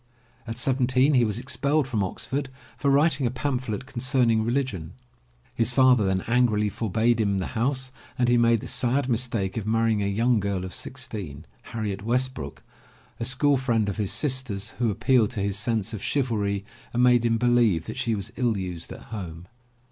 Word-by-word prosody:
At 115 0 -4
seventeen 130 +2 +2
he 125 -3 +5
was 105 -2 0
expelled 140 +3 0
from 110 -6 0
Oxford 135 +8 -3 0.3
for 140 - 0
writing 140 -1 +3
a - - 0
pamphlet 130 -2 -3
concerning 125 -3 +1
reli 125 +5 +1
gion. 95 -11 -7 0.6
His 115 +1 +1
father 125 -3 +5
then 95 0 +1
angrily 115 -3 +2
forbade 115 +3 +1
him 100 -2 +1
the 95 - -1
house 130 +3 -1 0.3
and 125 - +2
he 120 - +4
made 115 -2 +3
the - - -7
sad 130 +2 +1
mistake 115 -5 -1
of 110 -2 -3
marrying 115 -1 +2
a 100 - 0
young 115 +4 +2
girl 100 -2 -2
of 95 - -7
sixteen, 105 - -6 0.2
Harriet 105 -4 -4
Westbrook, 125 +4 -2 0.6
a 115 - -2
school 140 +3 +2
friend 115 -5 +1
of 100 - -4
his 105 -3 0
sister's, 125 -8 -2
who 120 -2 +2
appealed 110 +2 +2
to 110 - -5
his 100 0 0
sense 115 -1 -1
of 105 - -5
chivalry 105 -8 -1 0.3
and 120 +1 +2
made 125 -1 +5
him 115 -1 +2
believe 115 -8 +3
that - - -6
she 115 -2 0
was 100 - -5
ill 120 -4 +1
used 90 -3 -5
at - - -9
home. 85 -5 -6
115 Hz, 185 wpm, -25 LUFS, 105-130 Hz, 0.6 s, he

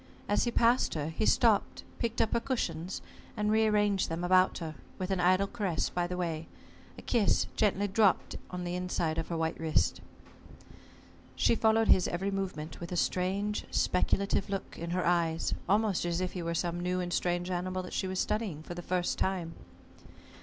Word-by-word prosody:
As 205 - +2
he 240 - 0
passed 235 -2 +3
her, 150 0 -2
he 215 +7 -1
stopped, 225 -4 +3 0.2
picked 230 0 0
up 220 - +1
her - - +3
cushions, 185 -9 -3 0.3
and 210 0 +1
re 220 0 +4
arranged 205 -2 +2
them 165 +2 -3
about 185 +1 +4
her, 160 -2 -5 0.2
with 185 +1 -3
an 190 - +1
idle 185 +2 +4
caress 200 -6 -1
by 175 -1 -1
the 180 0 -4
way, 165 -3 -3 0.5
a - - -10
kiss 225 -5 +2
gently 205 -1 +2
dropped 200 -1 +2
on 180 -1 -5
the 175 0 -3
inside 175 -3 -1
of 165 - -3
her 170 - -3
white 160 0 -1
wrist. 160 -1 +1 1.3
She - - +3
followed 225 0 +3
his 185 - +5
every 190 +3 -2
movement 185 -6 -4
with 170 0 -7
a 180 - -2
strange 195 +4 0
speculative 195 +2 +1
look 195 -1 -4
in 170 +1 -5
her 180 +1 0
eyes, 170 -2 +1 0.2
almost 205 -1 +2
as 170 0 -1
if 185 -1 -1
he 180 - -4
were 170 0 -2
some 175 +1 -1
new 180 +1 -1
and 175 -1 -3
strange 175 +1 0
animal 185 +1 -2
that 180 - -8
she 190 - -1
was 185 0 -2
studying 200 -9 -1
for 175 - -7
the 175 - -6
first 180 0 -1
time. 180 -3 -1
180 Hz, 190 wpm, -30 LUFS, 175-205 Hz, 1.3 s, his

